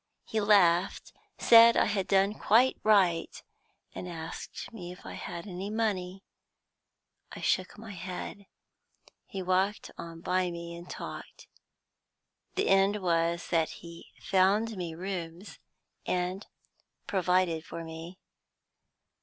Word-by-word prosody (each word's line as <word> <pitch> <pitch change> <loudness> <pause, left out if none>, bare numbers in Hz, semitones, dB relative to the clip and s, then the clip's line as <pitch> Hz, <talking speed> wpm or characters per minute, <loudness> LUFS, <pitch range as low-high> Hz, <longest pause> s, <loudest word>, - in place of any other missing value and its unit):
He 220 -2 -1
laughed, 190 -4 +3 0.2
said 230 0 +8
I - - +4
had 195 -3 -1
done 195 +1 +3
quite 235 +5 +4
right, 190 -6 +2 0.5
and 180 - -6
asked 165 +6 -7
me 180 -5 -7
if 180 - -13
I - - -7
had 170 0 -6
any 190 0 -5
money. 195 -4 -2 1.1
I - - -8
shook 185 +2 0
my 220 0 -9
head. 185 +2 -7 0.8
He 190 -1 -5
walked 190 +3 0
on 165 -1 -8
by 185 +1 +1
me, 170 0 -7
and 170 +1 -11
talked. - - -8 1.1
The - - +1
end 195 +2 +4
was, 170 0 +1
that 165 -2 +2 0.2
he 170 0 -11
found 200 +4 +2
me 175 -3 -5
rooms, 180 0 -6 0.5
and 180 +2 -2 0.6
provided 180 -3 +1
for 170 - -7
me. 165 +2 -9
185 Hz, 120 wpm, -29 LUFS, 170-200 Hz, 1.1 s, said